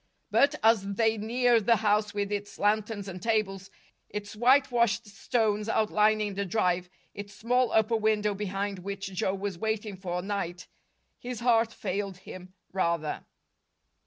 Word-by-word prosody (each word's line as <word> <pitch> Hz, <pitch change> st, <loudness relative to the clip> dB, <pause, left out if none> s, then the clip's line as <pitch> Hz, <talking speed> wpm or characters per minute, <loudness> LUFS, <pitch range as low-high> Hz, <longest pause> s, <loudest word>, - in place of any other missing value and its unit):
But, 280 Hz, +2 st, +4 dB
as 205 Hz, -3 st, +3 dB
they 225 Hz, +1 st, +2 dB
neared 235 Hz, 0 st, +2 dB
the 235 Hz, -, +6 dB
house 210 Hz, 0 st, +1 dB
with 205 Hz, 0 st, -2 dB
its 205 Hz, 0 st, -4 dB
lanterns 210 Hz, 0 st, 0 dB
and 185 Hz, -1 st, -7 dB
tables, 195 Hz, -3 st, -1 dB, 0.4 s
its 205 Hz, 0 st, -6 dB
whitewashed 240 Hz, -2 st, +3 dB
stones 215 Hz, 0 st, -1 dB
outlining 215 Hz, -1 st, +2 dB
the 200 Hz, +1 st, -2 dB
drive, 180 Hz, -2 st, 0 dB, 0.2 s
its 205 Hz, 0 st, -8 dB
small 250 Hz, +1 st, +1 dB
upper 220 Hz, +1 st, +3 dB
window 210 Hz, -1 st, +1 dB
behind 200 Hz, 0 st, -3 dB
which 195 Hz, +1 st, -6 dB
Joe 190 Hz, +1 st, 0 dB
was 195 Hz, -3 st, -4 dB
waiting 220 Hz, -2 st, -2 dB
for 180 Hz, -1 st, -4 dB
night, 185 Hz, -3 st, -4 dB, 0.5 s
his 245 Hz, -1 st, -6 dB
heart 230 Hz, -2 st, +3 dB
failed 195 Hz, -2 st, -4 dB
him, 185 Hz, 0 st, -11 dB, 0.2 s
rather. 170 Hz, -5 st, -1 dB
205 Hz, 140 wpm, -28 LUFS, 195-225 Hz, 0.5 s, the